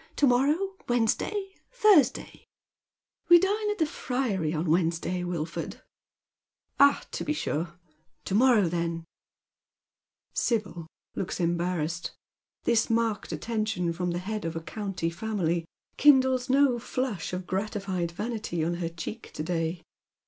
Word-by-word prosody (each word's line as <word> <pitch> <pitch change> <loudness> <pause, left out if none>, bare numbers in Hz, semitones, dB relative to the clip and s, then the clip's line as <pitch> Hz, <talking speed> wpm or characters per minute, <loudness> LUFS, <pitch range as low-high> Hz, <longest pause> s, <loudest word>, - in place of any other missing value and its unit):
To 290 - +3
morrow 270 +4 +4 0.2
•—Wednesday 385 - 0
— - - -29
Thursdny? 310 - +4 0.3
" - - -66
*' - - -48
We 345 - +10
dine 415 +4 +1
at 420 - -1
the 320 - +2
Friary 245 - -1
on 165 +1 -2
Wednesday, 170 +2 +1
Wilford." 170 -2 -4 0.5
" - - -46
Ah, 280 0 +6
to - - -3
be 300 - 0
sure. 170 - -2 0.5
To - - -3
morrow, 225 -3 +5
then? 170 0 -2 0.7
" - - -60 0.2
Sibyl 200 -8 -2 0.3
looks 190 - -3
embarrassed. 170 -1 -1 0.5
This 230 -1 +2
marked 225 -2 0
attention 215 -7 -1
from 180 +1 -2
the 175 - -1
head 210 +4 -4
of 165 0 -3
a 165 - -3
county 190 -2 -3
family 175 -3 -1 0.3
kindles 260 -3 +5
no 265 -2 +4
flush 245 -6 -3
of 180 0 -4
gratified 190 -2 -2
vanity 210 -3 -3
on 170 +2 -1
her 165 - -1
cheek 170 +7 -7
to 155 - -3
day. 165 0 -2
195 Hz, 140 wpm, -28 LUFS, 170-245 Hz, 0.7 s, We